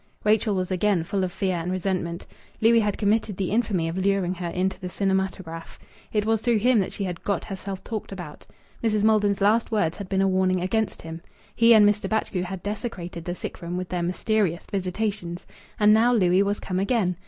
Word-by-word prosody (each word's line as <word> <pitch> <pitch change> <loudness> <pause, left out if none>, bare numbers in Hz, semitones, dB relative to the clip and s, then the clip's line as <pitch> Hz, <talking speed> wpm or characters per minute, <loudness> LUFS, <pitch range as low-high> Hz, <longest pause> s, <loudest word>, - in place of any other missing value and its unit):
Rachel 215 0 +2
was 185 0 -2
again 185 -1 +2
full 190 +3 -1
of 185 - -2
fear 185 -1 -1
and 170 +2 -3
resentment. 185 -2 -2 0.3
Louis 230 +1 +5
had 210 -2 0
committed 210 -1 +1
the 190 -2 -2
infamy 205 -7 +1
of 165 +3 -3
luring 190 -2 +1
her 180 -1 -5
into 185 +2 -1
the 180 -2 -5
cinematograph. 190 -3 -2 0.3
It 210 -1 0
was 225 -1 +1
through 240 -1 +2
him 240 +2 +3
that 190 - -1
she 200 - -4
had 180 -3 -5
"got 200 -4 -1
herself 195 -1 -6
talked 220 -3 -5
about." 175 -6 -9 0.4
Mrs. 215 -2 +1
Maldon's 210 -2 +3
last 220 +4 +3
words 190 -7 0
had 200 -3 -7
been 195 0 +2
a - - +3
warning 185 -1 +2
against 220 +4 -1
him. 165 0 -7 0.3
He 230 0 +5
and 210 -1 +7
Mr. 205 -1 0
Batchgrew 220 -4 -1
had 190 0 -6
desecrated 185 -6 -5
the 175 - -3
sick - - -7
room 175 +1 -4
with 185 0 -4
their 180 -1 -2
mysterious 180 0 0
visitations. 190 -2 -3 0.3
And 210 0 +6
now 230 +3 +4
Louis 185 -4 +4
was 200 +1 0
come 185 -1 -3
again. 195 -3 +1
195 Hz, 205 wpm, -25 LUFS, 180-210 Hz, 0.4 s, and